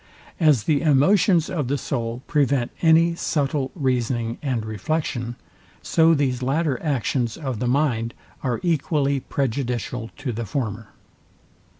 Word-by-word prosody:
As 150 Hz, -, +4 dB
the 145 Hz, +1 st, +2 dB
emotions 165 Hz, +4 st, +4 dB
of 150 Hz, -8 st, -2 dB
the 140 Hz, +3 st, 0 dB
soul 120 Hz, -2 st, -3 dB
prevent 140 Hz, -5 st, +1 dB
any 165 Hz, +1 st, +5 dB
subtile 145 Hz, -4 st, -1 dB
reasoning 120 Hz, -5 st, -1 dB
and 125 Hz, -6 st, -2 dB
reflection, 120 Hz, -, -2 dB, 0.5 s
so 165 Hz, 0 st, +4 dB
these 130 Hz, -4 st, 0 dB
latter 135 Hz, 0 st, 0 dB
actions 125 Hz, -5 st, -1 dB
of 130 Hz, -8 st, -4 dB
the 125 Hz, -, -1 dB
mind 120 Hz, -4 st, 0 dB, 0.3 s
are 125 Hz, -3 st, -1 dB
equally 145 Hz, -4 st, +1 dB
prejudicial 125 Hz, -3 st, -2 dB
to 135 Hz, -3 st, -3 dB
the 115 Hz, 0 st, -4 dB
former. 110 Hz, -3 st, -3 dB
135 Hz, 125 wpm, -23 LUFS, 120-150 Hz, 0.5 s, any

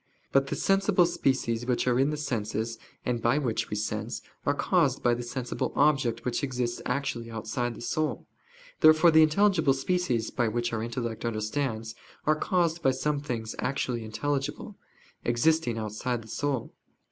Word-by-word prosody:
But 135 Hz, 0 st, +3 dB
the -, -, -2 dB
sensible 195 Hz, -2 st, +3 dB
species 120 Hz, -6 st, 0 dB
which 125 Hz, -2 st, +1 dB
are 125 Hz, 0 st, +3 dB
in 135 Hz, +2 st, +3 dB
the 150 Hz, -, -2 dB
senses, 115 Hz, -4 st, -2 dB, 0.3 s
and 120 Hz, -2 st, -1 dB
by 120 Hz, +5 st, +3 dB
which 125 Hz, -7 st, -1 dB
we -, -, -2 dB
sense, 110 Hz, +1 st, -3 dB, 0.2 s
are 145 Hz, -, +4 dB
caused 150 Hz, -5 st, +2 dB
by 120 Hz, -, +4 dB
the 120 Hz, -, -2 dB
sensible 125 Hz, 0 st, -3 dB
object 130 Hz, -6 st, +2 dB
which 125 Hz, +4 st, -1 dB
exists 125 Hz, -3 st, -2 dB
actually 125 Hz, -3 st, -2 dB
outside 115 Hz, +2 st, -3 dB
the -, -, -10 dB
soul. 155 Hz, +5 st, -2 dB, 0.5 s
Therefore 155 Hz, +2 st, +7 dB
the 160 Hz, 0 st, +7 dB
intelligible 160 Hz, -3 st, +4 dB
species, 135 Hz, -6 st, 0 dB
by 120 Hz, -2 st, +1 dB
which 120 Hz, +2 st, -1 dB
our 110 Hz, -, -1 dB
intellect 115 Hz, -1 st, -4 dB
understands, 110 Hz, 0 st, -2 dB, 0.3 s
are 155 Hz, -, +4 dB
caused 170 Hz, +1 st, 0 dB
by -, -, +4 dB
some 145 Hz, +3 st, 0 dB
things 115 Hz, -6 st, -4 dB
actually 125 Hz, -2 st, -1 dB
intelligible, 140 Hz, -, -3 dB, 0.5 s
existing 120 Hz, +1 st, +2 dB
outside 115 Hz, +2 st, -3 dB
the -, -, -14 dB
soul. 140 Hz, 0 st, -2 dB
125 Hz, 160 wpm, -28 LUFS, 115-150 Hz, 0.5 s, Therefore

